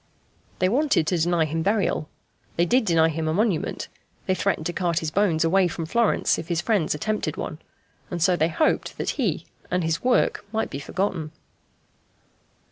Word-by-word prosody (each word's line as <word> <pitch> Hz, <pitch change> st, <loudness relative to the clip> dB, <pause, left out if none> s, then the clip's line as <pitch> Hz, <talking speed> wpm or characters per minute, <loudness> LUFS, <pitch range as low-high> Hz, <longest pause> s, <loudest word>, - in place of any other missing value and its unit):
They 185 Hz, -, +2 dB
wanted 265 Hz, -, +2 dB
to 175 Hz, +2 st, 0 dB
deny 170 Hz, 0 st, +2 dB
him 160 Hz, +2 st, -2 dB
burial 195 Hz, -5 st, 0 dB, 0.5 s
they 170 Hz, -, +3 dB
did 245 Hz, +6 st, +2 dB
deny 165 Hz, -3 st, +4 dB
him 160 Hz, 0 st, -2 dB
a 155 Hz, -, 0 dB
monument; 205 Hz, -5 st, 0 dB, 0.4 s
they 185 Hz, -, +2 dB
threatened 185 Hz, -4 st, -1 dB
to 175 Hz, -, -2 dB
cart 170 Hz, -2 st, -1 dB
his 160 Hz, -2 st, -1 dB
bones 175 Hz, -4 st, +2 dB
away 185 Hz, +2 st, +4 dB
from 165 Hz, -1 st, -4 dB
Florence 230 Hz, +7 st, +2 dB
if 160 Hz, -, -7 dB
his 170 Hz, -2 st, 0 dB
friends 180 Hz, -4 st, +1 dB
attempted 215 Hz, +8 st, -2 dB
one. -, -, -5 dB, 0.5 s
And 175 Hz, -, -4 dB
so 175 Hz, +2 st, +3 dB
they 160 Hz, -1 st, +1 dB
hoped 310 Hz, -, 0 dB
that -, -, -1 dB
he -, -, -1 dB, 0.2 s
and 180 Hz, 0 st, 0 dB
his 165 Hz, 0 st, -1 dB
work 250 Hz, 0 st, +2 dB
might 220 Hz, 0 st, -1 dB
be 140 Hz, -, -4 dB
forgotten. 165 Hz, 0 st, -2 dB
175 Hz, 180 wpm, -24 LUFS, 160-200 Hz, 0.5 s, deny